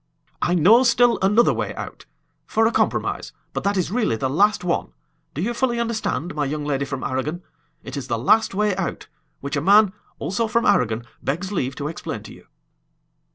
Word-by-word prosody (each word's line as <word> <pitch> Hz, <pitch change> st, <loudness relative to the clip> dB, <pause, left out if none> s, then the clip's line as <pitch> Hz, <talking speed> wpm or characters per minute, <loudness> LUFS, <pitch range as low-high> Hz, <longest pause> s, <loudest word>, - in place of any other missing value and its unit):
"I 175 Hz, -, +2 dB
know 200 Hz, +9 st, +6 dB
still 240 Hz, -1 st, +4 dB
another 210 Hz, +5 st, +4 dB
way -, -, -3 dB
out -, -, -8 dB, 0.4 s
for 225 Hz, +1 st, +2 dB
a 225 Hz, -, +3 dB
compromise, -, -, -1 dB, 0.2 s
but -, -, -3 dB
that 200 Hz, 0 st, +1 dB
is 180 Hz, -1 st, -1 dB
really 220 Hz, -, +1 dB
the 130 Hz, +4 st, -2 dB
last 205 Hz, +8 st, +3 dB
one. 170 Hz, -, -1 dB, 0.4 s
Do 155 Hz, -, -2 dB
you 240 Hz, +4 st, -1 dB
fully 240 Hz, -1 st, 0 dB
understand, 220 Hz, -, -2 dB
my 150 Hz, -, -1 dB
young 150 Hz, +1 st, -3 dB
lady 140 Hz, -1 st, -1 dB
from 135 Hz, -1 st, -5 dB
Aragon? 150 Hz, +7 st, -3 dB, 0.4 s
It -, -, -7 dB
is 135 Hz, -2 st, -5 dB
the 120 Hz, -2 st, -1 dB
last 195 Hz, -, +3 dB
way 210 Hz, -1 st, +1 dB
out, 190 Hz, -, -3 dB, 0.4 s
which 140 Hz, +1 st, -3 dB
a 145 Hz, -, 0 dB
man, 200 Hz, +3 st, +5 dB, 0.2 s
also 220 Hz, +5 st, -1 dB
from 235 Hz, +1 st, +1 dB
Aragon, 115 Hz, 0 st, +2 dB, 0.2 s
begs 175 Hz, +8 st, -3 dB
leave 135 Hz, -9 st, -2 dB
to 145 Hz, 0 st, -4 dB
explain 160 Hz, -, -5 dB
to -, -, -11 dB
you." -, -, -17 dB
180 Hz, 195 wpm, -22 LUFS, 140-220 Hz, 0.4 s, know